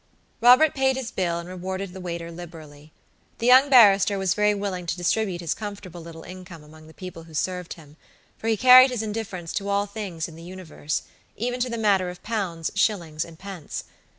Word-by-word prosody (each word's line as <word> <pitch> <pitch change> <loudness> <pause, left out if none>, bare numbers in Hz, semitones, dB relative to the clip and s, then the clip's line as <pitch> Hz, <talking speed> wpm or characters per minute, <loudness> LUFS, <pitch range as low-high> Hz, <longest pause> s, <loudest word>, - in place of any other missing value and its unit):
Robert 255 +6 +6
paid 265 -1 +1
his 255 -3 -5
bill 175 -3 -1
and 170 0 -7
rewarded 185 +1 -5
the 190 - -9
waiter 170 -1 -5
liberally. 155 -3 -12 0.5
The 230 - -4
young 260 +3 +7
barrister 205 -6 +6
was 190 -2 +1
very 210 0 +2
willing 190 -3 -4
to 170 - -2
distribute 180 0 -1
his 170 - -1
comfortable 200 -5 -8
little 165 0 -11
income 180 -3 -11
among 155 +1 -16
the 160 - -15
people 180 -3 -9
who 160 -1 -13
served 180 +1 -3
him, 155 -2 -17 0.4
for 225 - -7
he 225 -1 +2
carried 255 +3 +8
his 245 -3 -3
indifference 205 -6 -5
to 200 -1 -3
all 200 0 +1
things 200 -6 -5
in 165 - -12
the 165 - -12
universe, 170 -4 -5 0.3
even 245 +2 -3
to 250 +1 0
the 235 - -4
matter 200 -4 +2
of 180 0 -11
pounds, 185 -8 -3
shillings 170 -7 0
and 165 -1 -13
pence. 190 -4 -7
185 Hz, 200 wpm, -24 LUFS, 170-215 Hz, 0.5 s, carried